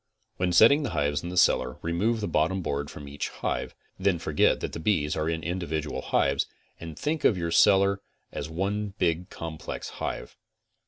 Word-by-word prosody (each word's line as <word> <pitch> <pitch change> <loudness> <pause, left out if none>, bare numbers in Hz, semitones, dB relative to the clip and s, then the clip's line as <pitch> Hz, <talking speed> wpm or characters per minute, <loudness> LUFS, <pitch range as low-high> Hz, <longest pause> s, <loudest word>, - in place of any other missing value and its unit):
When 90 0 +1
setting 115 - +7
the 140 - -2
hives 75 0 +1
in 85 - -5
the 90 - -5
cellar 65 -7 +3
remove 105 +8 0
the 105 - -1
bottom 85 +3 +1
board 70 -2 -2
from 75 - -9
each 70 +1 -4
hive; - - -3 0.2
then 95 -2 +2
forget 80 -2 +2
that - - -4
the - - -4
bees 80 -5 +1
are 80 0 -1
in 80 -1 -2
individual 80 -5 -3
hives, 70 +1 +1 0.3
and 80 -2 -8
think 150 - -2
of 100 - +4
your 85 -1 -2
cellar 100 +1 +5 0.3
as 75 - -5
one 100 +4 -2
big 85 -1 0
complex 80 -1 -6
hive. - - -4
85 Hz, 180 wpm, -27 LUFS, 75-100 Hz, 0.3 s, setting